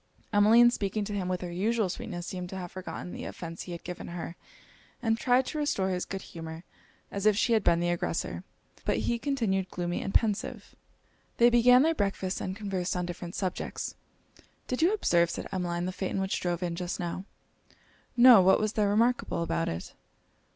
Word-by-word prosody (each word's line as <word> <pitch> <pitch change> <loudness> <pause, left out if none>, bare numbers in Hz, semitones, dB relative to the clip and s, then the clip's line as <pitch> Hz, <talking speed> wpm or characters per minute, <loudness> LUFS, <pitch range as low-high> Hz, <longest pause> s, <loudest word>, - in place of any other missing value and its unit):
Emmeline 225 +4 +7
speaking 205 -2 -2
to 205 - -5
him 195 -3 -2
with 180 -1 -2
her 175 -1 -5
usual 215 +4 +1
sweetness, 175 -1 -5
seemed 180 -1 -5
to 190 - -6
have 180 -2 -6
forgotten 185 -1 -7
the - - -7
offence 165 -1 -7
he 180 - -7
had 170 - -7
given 180 0 -7
her, 170 0 -6 0.6
and 225 -1 0
tried 250 +1 +3
to 305 - -4
restore 200 -11 0
his 180 -1 -2
good 195 -1 -6
humour 165 0 -8 0.5
as 200 +1 0
if 210 -2 +4
she 235 +2 +2
had 220 -3 +3
been 170 - +4
the 175 0 0
aggressor: 175 - -2 0.4
but - - +1
he 235 0 0
continued 225 -9 0
gloomy 175 -1 -3
and 195 - -4
pensive. 215 -3 0 0.6
They 240 +1 +6
began 250 +2 +6
their 325 +1 +3
breakfast, 195 -6 -2
and 185 - -3
conversed 195 -4 -2
on 180 0 -1
different 175 +1 -6
subjects. 185 -2 -3 0.7
'Did 250 - -2
you 340 +4 +5
observe,' 170 - +2
said - - -4
Emmeline, 175 -2 -2
'the 185 - -2
phaeton 190 +1 -3
which 190 0 -1
drove 175 0 -2
in 170 -1 -2
just 180 +2 -4
now?' 180 +1 -4 0.9
'No 240 -4 +9
what 190 +1 +5
was 215 0 0
there 210 -2 +2
remarkable 230 -4 +1
about 165 0 -1
it?' 85 +1 -6
190 Hz, 195 wpm, -29 LUFS, 175-225 Hz, 0.9 s, No